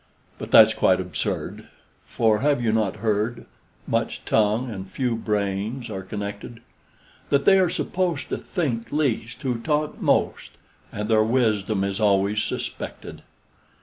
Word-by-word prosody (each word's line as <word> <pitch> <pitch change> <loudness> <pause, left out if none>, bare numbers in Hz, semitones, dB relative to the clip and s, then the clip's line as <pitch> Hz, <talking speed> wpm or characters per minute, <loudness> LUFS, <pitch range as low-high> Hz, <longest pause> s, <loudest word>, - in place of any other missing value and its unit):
But - - -6
that's - - +8
quite 95 0 +3
absurd; 90 -4 -4 0.4
for 110 -2 +2
have 145 -1 +2
you 115 -2 +1
not 110 -3 0
heard, 110 +2 0 0.4
Much - - -2
tongue 110 +3 +2
and 95 -5 -7
few 125 0 -1
brains 105 +2 -2
are 95 -2 -4
connected, 105 +4 -7 0.7
That 140 0 +2
they 195 -1 +6
are 185 -2 +3
supposed 175 -3 -2
to - - -2
think 130 - -3
least 130 -5 -1
who 125 -3 -1
talk 150 +4 -1
most, - - 0 0.3
And 105 +1 -4
their 110 -1 +4
wisdom 110 -4 +1
is 100 +1 -2
always 100 0 +2
suspected? - - -5
110 Hz, 140 wpm, -24 LUFS, 100-130 Hz, 0.7 s, that's